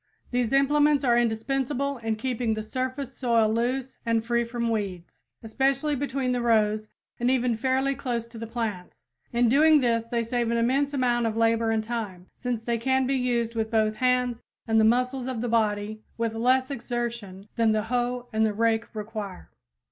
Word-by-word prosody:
These 245 -2 0
implements 290 +1 +3
are 240 -3 +4
indispensable 265 +4 0
in 225 -1 -1
keeping 230 -1 -1
the 215 - -4
surface 260 +3 -4
soil 230 -4 +2
loose 250 +3 -2
and 230 -1 0
free 235 0 +1
from 235 0 -2
weeds, 195 -5 -4 0.2
especially 270 +6 0
between 270 -2 -1
the 250 -1 0
rows 215 -2 +2 0.3
and 240 +1 +1
even 250 -2 +2
fairly 265 +4 +1
close 240 -3 -3
to 230 -1 -11
the 230 - -5
plants. 220 -6 -5 0.3
In 240 0 +3
doing 300 +5 +5
this 230 -3 +1
they 235 0 -1
save 235 0 -1
an 235 - +1
immense 275 +5 +1
amount 240 -3 +1
of 220 0 -3
labor 230 0 +2
and 220 -1 +1
time, 215 -6 -5
since 245 -3 -3
they 235 0 -1
can 265 +2 +1
be 270 - 0
used 240 -3 0
with 220 -1 -1
both 215 -1 +1
hands 250 -2 +1 0.3
and 225 0 +3
the - - +5
muscles 250 +3 +1
of 255 -3 -3
the 245 - -2
body 215 -2 0 0.2
with 230 -1 -1
less 255 +4 +2
exertion 235 -6 -4
than 230 -2 +3
the 215 -1 +1
hoe 245 +1 -2
and 220 0 +2
the 215 -1 +2
rake 225 +1 0
require. 210 -3 -6
235 Hz, 185 wpm, -26 LUFS, 225-255 Hz, 0.3 s, doing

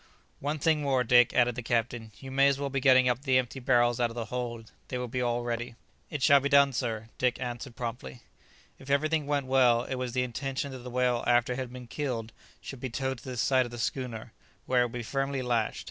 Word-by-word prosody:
"One 145 +2 -2
thing 155 +1 +2
more, 135 -3 +1
Dick," 120 0 +5
added 120 -1 +4
the 125 - -5
captain; 115 -1 -2
"you 135 -1 -9
may 135 +1 +4
as 140 -1 +2
well 140 -1 -3
be 135 - 0
getting 130 -1 +5
up 125 0 +1
the 130 -2 +2
empty 130 +1 -2
barrels 120 -2 +2
out 120 -1 +2
of 115 - -10
the 115 -2 -3
hold; 120 -2 -4 0.2
they 125 - -3
will 125 0 -3
be 125 +2 -3
all 120 0 0
ready." 120 0 -4 0.3
"It 150 -5 -4
shall 140 0 +7
be 140 +1 -1
done, 140 -1 +5
sir," 115 -3 -3 0.3
answered 120 +1 -4
Dick 120 - -20
promptly. 120 -1 -6 0.6
If 135 - -12
everything 150 +1 +1
went 145 -2 0
well 125 -3 +4
it 130 - -5
was 125 -2 -4
the 125 0 +1
intention 135 +3 -3
that 130 - -7
the 125 +1 -8
whale 125 -1 +1
after 120 0 +3
it 125 - -5
had 130 -2 -4
been 125 -1 -9
killed 115 -4 -4 0.3
should 135 - -8
be 130 - -4
towed 130 +1 -3
to - - -17
the 130 -2 -6
side 130 +1 +2
of - - -13
the 120 - -7
schooner, 115 -2 -4 0.3
where 125 -1 +3
it - - +3
would 120 - -6
be 120 -1 -4
firmly 135 +2 -2
lashed. 120 -3 0
125 Hz, 245 wpm, -29 LUFS, 120-135 Hz, 0.6 s, shall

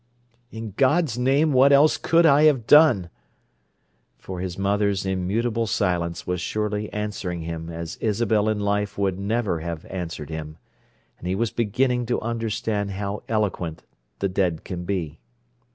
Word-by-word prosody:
"In 110 -2 -7
God's 140 -2 +2
name, 140 +4 +3
what 135 +2 +6
else 145 +2 +6
could 165 +1 +3
I 150 0 +6
have 135 -7 +3
done?" 120 - +5 1.1
For 95 -1 -7
his 90 -1 -4
mother's 100 0 0
immutable 110 +5 -1
silence 90 -5 -1
was 90 -1 -2
surely 105 0 -2
answering 100 -5 -4
him 80 0 -5
as 85 0 -6
Isabel 110 -1 +1
in 110 -1 0
life 100 0 -1
would 95 -2 0
never 105 -3 -1
have 85 0 -5
answered 80 -5 -5
him, 80 0 -6 0.6
and 90 - -7
he 95 - 0
was 115 +2 0
beginning 120 +2 0
to 120 - 0
understand 110 -2 -2
how 100 +1 -4
eloquent 100 -7 -2 0.3
the 100 - 0
dead 90 -4 -1
can 90 -1 -6
be. 85 -5 -3
100 Hz, 150 wpm, -24 LUFS, 90-115 Hz, 1.1 s, what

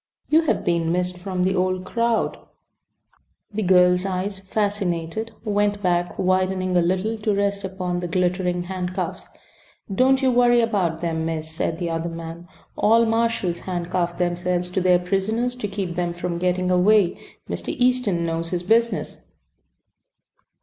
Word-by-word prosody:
You 315 +2 +6
have 320 - -1
been 170 -1 +1
missed 180 +1 0
from 180 0 -3
the 190 +1 +1
old 185 0 0
crowd." 230 +2 0 1.1
The 215 - -1
girl's 180 -1 +4
eyes, 195 +1 -2
fascinated, 200 -1 -2
went 205 -1 0
back, 175 -1 0
widening 185 0 +1
a 175 - +5
little, 190 +6 0
to 210 -1 0
rest 200 0 0
upon 185 -2 -3
the 175 - -3
glittering 180 0 0
handcuffs. 180 -1 -4 0.7
"Don't 265 +5 +3
you 260 - +4
worry 240 0 +4
about 190 -8 0
them, 165 -2 -1
miss," 160 -1 -3
said 160 0 -2
the 170 -1 -3
other 165 +1 -2
man. 165 +1 -8 0.3
"All 230 +2 +4
marshals 225 -6 0
handcuff 175 -1 -2
themselves 180 0 -1
to 185 - 0
their 180 0 +5
prisoners 200 +7 -1
to 215 - -3
keep 195 -3 -4
them 175 -1 -2
from 175 0 -3
getting 180 0 0
away. 185 0 +4 0.3
Mr. - - -4
Easton 245 -9 +1
knows 165 0 -2
his 175 0 -2
business." 230 +4 +1
185 Hz, 150 wpm, -23 LUFS, 175-205 Hz, 1.1 s, You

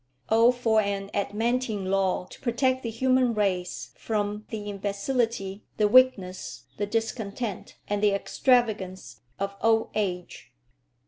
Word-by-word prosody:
Oh 230 +2 +6
for 230 -3 +2
an 200 -1 -3
adamantine 210 -1 -1
law 190 -2 +1
to - - -12
protect 260 +1 +1
the 230 - -3
human 255 +1 +2
race 185 -4 -1
from 210 -1 -3
the 215 -2 -5
imbecility, 200 0 -2
the 210 - +4
weakness, 190 - +3
the 205 - -1
discontent, 220 -1 -3
and 205 0 -1
the 210 - +5
extravagance 205 -2 0 0.2
of 200 0 -3
old 225 0 +3
age! 180 -9 -3
210 Hz, 125 wpm, -27 LUFS, 195-235 Hz, 0.2 s, Oh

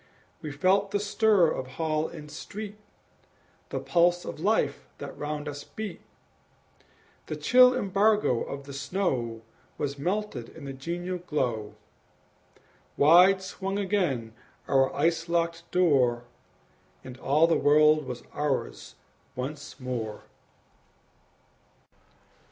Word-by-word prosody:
We 150 - -5
felt 190 +7 +2
the 205 0 0
stir 205 -3 +3
of 130 - -4
hall 155 -1 0
and 150 -3 -10
street, 210 0 -8 0.9
The - - -3
pulse 175 0 +2
of - - -6
life 210 +7 0
that - - -8
round 150 0 -4
us 145 -1 -6
beat; 215 -1 -7 1.3
The - - -3
chill 250 0 +6
embargo 200 - +2
of 140 0 -5
the 140 0 -10
snow 135 - -2 0.3
Was 140 -1 -3
melted 180 - -2
in 160 -3 -11
the 135 - -5
genial 175 +6 -4
glow; 125 -11 -2 1.2
Wide 180 +6 +6
swung 195 +1 -4
again 180 - -1 0.3
our 135 -1 +3
ice 165 +3 +1
locked 170 0 -1
door, 130 -9 +3 0.8
And 130 0 -10
all 150 +5 +3
the 165 - +3
world 150 +1 +4
was 120 -1 -6
ours 135 - -3 0.4
once 140 +2 -6
more! 120 -5 -4
155 Hz, 115 wpm, -27 LUFS, 135-190 Hz, 1.3 s, chill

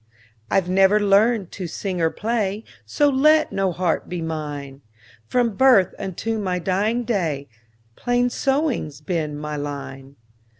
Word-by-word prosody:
I - - +4
've 180 - -6
never 195 +3 +4
learned 205 0 +3
to 185 -3 -5
sing 180 +1 -4
or 165 - +3
play, 215 0 -2 0.2
So 290 - +2
let 305 +3 +4
no 195 -1 0
harp 175 -1 -1
be 175 - -4
mine; 145 -4 -5 0.5
From 240 -4 +1
birth 245 -8 +5
unto 220 +4 -3
my 185 -3 -1
dying 200 +7 0
day, 165 - -2 0.5
Plain 245 0 0
sewing 275 - 0
's 145 - -14
been 155 -2 -3
my 150 0 -5
line. 140 -1 -7
190 Hz, 145 wpm, -22 LUFS, 160-230 Hz, 0.5 s, birth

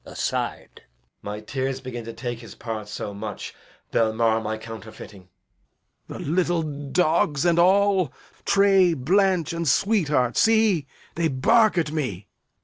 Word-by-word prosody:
Edg. - - -12
[aside] - - -3 0.5
My 105 +1 -6
tears 130 +4 -3
begin 125 -3 -7
to 115 - -7
take 120 -1 -5
his 115 - -12
part 110 -3 -6
so 105 -1 -5
much 105 0 -6 0.4
They'll 110 -1 +2
mar 115 0 +2
my 110 0 -3
counterfeiting. 110 -4 -11 0.8
Lear. - - -7
The - - -6
little 175 +1 +1
dogs 150 +1 0
and 170 -1 +3
all, 190 -3 +3 0.3
Tray, 195 -3 +4
Blanch, 180 +4 +1
and 170 -1 -3
Sweetheart, 150 - +2
see, 220 - +3 0.3
they 170 0 0
bark 215 - +3
at 160 -3 0
me. 150 -9 -2
Edg. - - -52
145 Hz, 145 wpm, -24 LUFS, 115-180 Hz, 0.8 s, Tray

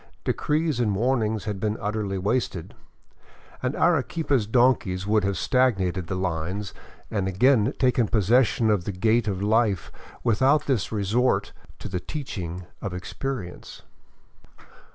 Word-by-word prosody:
De - - +1
crees 155 -3 0
and 105 -5 +1
warnings 110 -1 0
had 105 -3 -3
been 105 +2 -1
utterly 105 -2 -2
wasted, 95 -3 -2 0.9
and 130 +2 -1
Arequipa's 145 -6 +1
donkeys 110 -6 +2
would 105 0 +2
have 100 -1 0
stagnated 95 -5 +1
the 95 - -2
lines 90 +2 -3 0.4
and 100 -3 -1
again 115 +4 +3
taken 125 -3 +2
possession 115 +1 +3
of 95 -5 0
the - - -2
gait 110 +4 +1
of 100 -1 -2
life 105 -4 +1 0.3
without 130 +6 +3
this 125 - 0
resort 110 +4 +1 0.2
to - - -7
the 90 -3 -3
teaching 90 - -6 0.2
of 95 -3 -4
experience. 90 +1 -6
105 Hz, 130 wpm, -25 LUFS, 95-125 Hz, 0.9 s, again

